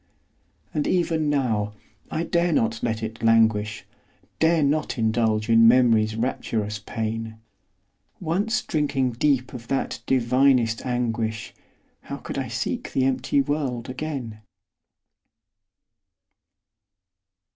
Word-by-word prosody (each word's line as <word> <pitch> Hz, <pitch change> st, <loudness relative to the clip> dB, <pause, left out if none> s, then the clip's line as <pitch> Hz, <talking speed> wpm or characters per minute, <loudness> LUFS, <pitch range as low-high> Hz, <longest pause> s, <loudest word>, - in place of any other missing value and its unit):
And 150 Hz, -, -1 dB
even 165 Hz, -4 st, +1 dB
now, 110 Hz, -8 st, 0 dB, 0.4 s
I 160 Hz, +1 st, -2 dB
dare 170 Hz, +1 st, +1 dB
not 115 Hz, -6 st, +1 dB
let 110 Hz, -1 st, -2 dB
it 110 Hz, +1 st, -6 dB
languish, 110 Hz, -2 st, +2 dB, 0.5 s
Dare 160 Hz, -1 st, +3 dB
not 150 Hz, 0 st, 0 dB
indulge 110 Hz, -1 st, +1 dB
in 115 Hz, 0 st, +6 dB
Memory's 115 Hz, -3 st, +4 dB
rapturous 110 Hz, -3 st, -2 dB
pain; 110 Hz, +1 st, -4 dB, 0.8 s
Once 195 Hz, +7 st, 0 dB
drinking 140 Hz, -4 st, 0 dB
deep 130 Hz, +1 st, 0 dB
of 120 Hz, -2 st, -9 dB
that 135 Hz, -, -2 dB
divinest 125 Hz, -2 st, +3 dB
anguish, 115 Hz, -3 st, -2 dB, 0.5 s
How -, -, -6 dB
could -, -, -5 dB
I -, -, -3 dB
seek -, -, -3 dB
the 130 Hz, -, +2 dB
empty 130 Hz, +1 st, +1 dB
world 135 Hz, -4 st, -2 dB
again? 130 Hz, -6 st, -5 dB
120 Hz, 105 wpm, -24 LUFS, 110-140 Hz, 0.8 s, in